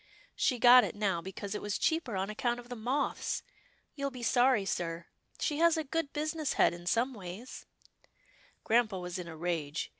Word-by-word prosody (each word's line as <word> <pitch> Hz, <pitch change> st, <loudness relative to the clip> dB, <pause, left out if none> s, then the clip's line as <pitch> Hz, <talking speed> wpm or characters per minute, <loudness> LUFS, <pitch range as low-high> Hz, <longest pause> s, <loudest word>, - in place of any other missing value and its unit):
" -, -, -26 dB
She 250 Hz, -, +1 dB
got 245 Hz, +1 st, +8 dB
it -, -, -3 dB
now, 195 Hz, -5 st, 0 dB
because 195 Hz, +2 st, -6 dB
it 210 Hz, -, -4 dB
was 205 Hz, -1 st, -2 dB
cheaper 320 Hz, -9 st, 0 dB
on 190 Hz, +2 st, -2 dB
account 240 Hz, +3 st, -1 dB
of 240 Hz, 0 st, -12 dB
the 245 Hz, -, -5 dB
moths 255 Hz, +5 st, -1 dB, 0.2 s
— -, -, -38 dB
you'll 280 Hz, -1 st, -2 dB
be 250 Hz, -3 st, -9 dB
sorry, 245 Hz, -3 st, +3 dB
sir. 170 Hz, -3 st, -3 dB, 0.3 s
She 300 Hz, -1 st, -1 dB
has 335 Hz, 0 st, +5 dB
a 315 Hz, -, 0 dB
good 305 Hz, 0 st, -2 dB
business 310 Hz, 0 st, -2 dB
head -, -, +4 dB
in 175 Hz, 0 st, -10 dB
some 240 Hz, +7 st, +1 dB
ways 200 Hz, +4 st, -9 dB, 0.3 s
— -, -, -35 dB
" -, -, -31 dB
Grampa 225 Hz, -3 st, +2 dB
was 180 Hz, 0 st, -5 dB
in 175 Hz, -, -6 dB
a 160 Hz, -1 st, -8 dB
rage. 160 Hz, -3 st, -2 dB
230 Hz, 210 wpm, -31 LUFS, 185-265 Hz, 0.3 s, got